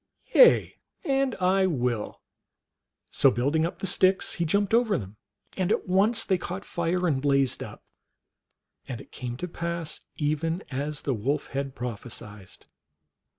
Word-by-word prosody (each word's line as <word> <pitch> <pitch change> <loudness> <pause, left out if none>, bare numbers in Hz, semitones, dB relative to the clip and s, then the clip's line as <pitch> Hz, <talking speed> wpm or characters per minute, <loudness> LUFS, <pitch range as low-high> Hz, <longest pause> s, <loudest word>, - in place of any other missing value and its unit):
Yea, - - +6 0.3
and 270 - +1
I 190 +1 +2
will! 125 - -2 0.4
" - - -60 0.3
So - - +5
building 145 +7 +1
up - - -8
the - - -5
sticks, 190 0 +3
he 170 - -1
jumped 200 +5 +1
over 230 -4 +3
them, 100 0 -8 0.4
and 185 0 0
at - - 0
once 200 +5 +2
they 190 -2 +1
caught 185 +3 -5
fire 175 +1 -1
and 140 -5 +1
blazed 140 -2 +1
up, - - -8 1.0
and 125 -4 -5
it - - -14
came 120 -1 -6
to 180 - -4
pass 170 -2 -4
even 160 +4 -1
as 145 +3 -3
the 135 - -1
Wolf 135 +7 -2
had 135 0 -4
prophesied. 105 -5 -7
160 Hz, 150 wpm, -27 LUFS, 130-185 Hz, 1.0 s, Yea